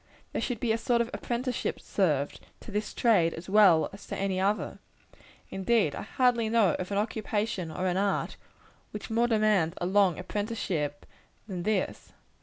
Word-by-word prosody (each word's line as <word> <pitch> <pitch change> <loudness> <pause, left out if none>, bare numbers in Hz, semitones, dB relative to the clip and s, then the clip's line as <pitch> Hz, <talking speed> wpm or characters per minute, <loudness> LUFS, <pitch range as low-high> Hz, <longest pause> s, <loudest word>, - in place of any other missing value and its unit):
There - - -1
should 245 -4 -2
be 235 -1 0
a 225 - +1
sort 240 0 +1
of 235 - -2
apprenticeship 245 0 -2
served, 150 -8 0 0.2
to - - -10
this 210 +1 -2
trade 190 -9 +3
as 165 - -9
well 190 -5 +5
as 200 - -12
to - - -4
any 195 -1 -1
other. 200 +3 0 0.7
Indeed, 195 -5 +1
I - - -5
hardly 235 0 +1
know 220 -7 +4
of 180 - -4
an 200 - 0
occupation 210 -4 -1
or 180 +3 -3
an 180 0 +1
art, 200 0 0 0.5
which 210 +1 -7
more 235 +2 +3
demands 210 -7 +2
a - - -2
long 190 -2 +3
apprenticeship, 190 -9 -3 0.4
than 185 -4 -4
this. 205 0 -2
205 Hz, 170 wpm, -28 LUFS, 185-225 Hz, 0.7 s, well